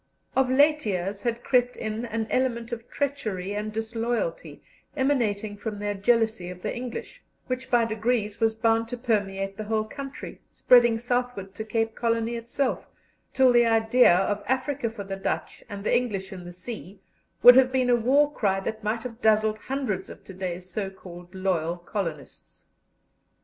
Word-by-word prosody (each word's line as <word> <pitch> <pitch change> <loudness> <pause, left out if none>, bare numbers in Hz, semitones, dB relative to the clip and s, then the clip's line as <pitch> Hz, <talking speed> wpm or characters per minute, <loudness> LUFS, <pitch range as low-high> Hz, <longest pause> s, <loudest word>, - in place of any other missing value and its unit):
Of 265 -1 +3
late 295 +3 +4
years 195 +1 -2
had 235 -1 -2
crept 250 -1 +2
in 220 +2 -3
an 225 -1 -2
element 240 -2 0
of 235 0 -6
treachery 215 -10 -2
and 210 +1 -3
disloyalty, 230 - -3 0.3
emanating 225 -7 0
from 210 0 -5
their 205 0 -2
jealousy 220 -2 +1
of 180 0 -10
the - - -2
English, 250 - -6 0.2
which 255 0 -4
by 240 -2 +4
degrees 220 -1 -1
was 225 -1 +2
bound 225 0 +2
to 245 +1 -5
permeate 195 -5 -1
the 215 - -5
whole 215 0 0
country, 275 +6 -8
spreading 240 -2 +5
southward 245 -5 -2
to 220 - -5
Cape 225 0 -1
Colony 230 0 0
itself, 240 +3 -2 0.4
till 260 -2 +4
the 240 -1 +5
idea 225 -2 +5
of 205 +3 0
"Africa 260 0 0
for 220 -2 -7
the 195 0 -5
Dutch, 195 - -3
and 200 -1 -6
the - - +2
English 205 -6 -1
in 180 -2 -9
the 175 - -8
sea," 195 0 -8 0.4
would 245 0 +11
have 260 0 +5
been 255 -1 +2
a - - +6
war 280 +5 +3
cry 195 -7 +1
that 220 +3 -5
might 220 +2 -1
have 240 -1 -8
dazzled 215 -1 +3
hundreds 250 -9 -3
of - - -11
to 190 - -11
day's 180 -1 -5
so 195 +2 -3
called 180 -1 -12
loyal 175 -3 -1
colonists. 175 -2 -6
225 Hz, 170 wpm, -26 LUFS, 200-245 Hz, 0.4 s, would